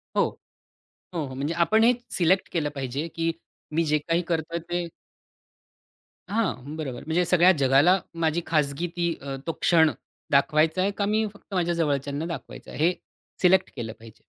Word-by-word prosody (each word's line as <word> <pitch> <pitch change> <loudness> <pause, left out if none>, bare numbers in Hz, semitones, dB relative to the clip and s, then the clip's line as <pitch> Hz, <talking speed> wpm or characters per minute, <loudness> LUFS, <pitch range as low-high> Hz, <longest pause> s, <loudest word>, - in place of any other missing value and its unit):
हो. - - +3 0.9
हो, 165 -4 -2
हो. 130 - -8
म्हणजे 145 +4 -2
आपण 220 +6 +3
हे 245 - +6 0.2
सिलेक्ट 185 +2 +2
केलं 155 -3 0
पाहिजे, 135 +3 -3
की 165 0 0 0.4
मी 165 - +3
जे 150 0 +2
काही 165 +3 0
करतोय 165 0 -1
ते 175 0 -1 1.4
हां, 170 - -2
बरोबर. 135 -6 -5
म्हणजे 165 +3 +1
सगळ्या 180 +1 +5
जगाला 140 +8 +5 0.2
माझी 160 +2 +1
खाजगी 155 +1 0
ती 170 -1 0
अ, 135 -1 -5
तो - - +1
क्षण 160 -3 +5 0.4
दाखवायचा 155 +5 +3
आहे 195 +2 +2
का 200 - +1
मी 215 +2 +1
फक्त 205 - -16
माझ्या 175 -2 +1
जवळच्यांना 145 -2 -1
दाखवायचा 170 -1 -7
आहे. 155 - 0
हे 180 - +2 0.5
सिलेक्ट 185 +1 +4
केलं 115 -4 -5
पाहिजे. 115 -1 -15
165 Hz, 165 wpm, -25 LUFS, 145-175 Hz, 1.4 s, हे